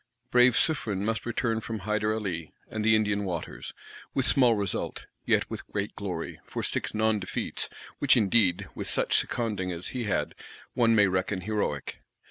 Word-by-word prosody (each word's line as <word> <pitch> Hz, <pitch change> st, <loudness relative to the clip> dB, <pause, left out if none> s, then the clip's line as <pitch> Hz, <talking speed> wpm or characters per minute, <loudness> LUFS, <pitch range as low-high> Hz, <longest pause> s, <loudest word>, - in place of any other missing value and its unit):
Brave 125 Hz, 0 st, +6 dB
Suffren 105 Hz, -, 0 dB
must 110 Hz, 0 st, -1 dB
return 115 Hz, -1 st, 0 dB
from 115 Hz, 0 st, -4 dB
Hyder 105 Hz, +2 st, 0 dB
Ally 95 Hz, -7 st, -2 dB, 0.2 s
and 110 Hz, -1 st, -3 dB
the 110 Hz, 0 st, +5 dB
Indian 105 Hz, -1 st, +1 dB
Waters; 85 Hz, -5 st, -5 dB, 0.4 s
with 135 Hz, -, +2 dB
small 125 Hz, -4 st, +5 dB
result; 100 Hz, -2 st, -2 dB, 0.2 s
yet -, -, +3 dB
with -, -, -7 dB
great -, -, -3 dB
glory -, -, -5 dB
for -, -, -5 dB
"six" -, -, -1 dB
non 110 Hz, 0 st, +2 dB
defeats;—which 130 Hz, +7 st, -1 dB
indeed, 100 Hz, -4 st, +3 dB
with -, -, -5 dB
such -, -, +1 dB
seconding 105 Hz, -6 st, 0 dB
as 85 Hz, 0 st, -3 dB
he 125 Hz, -3 st, -3 dB
had, 100 Hz, -, -1 dB, 0.4 s
one 115 Hz, -2 st, +4 dB
may 105 Hz, -2 st, +6 dB
reckon 95 Hz, +1 st, 0 dB
heroic. 100 Hz, -8 st, -2 dB
110 Hz, 160 wpm, -28 LUFS, 95-115 Hz, 0.4 s, Brave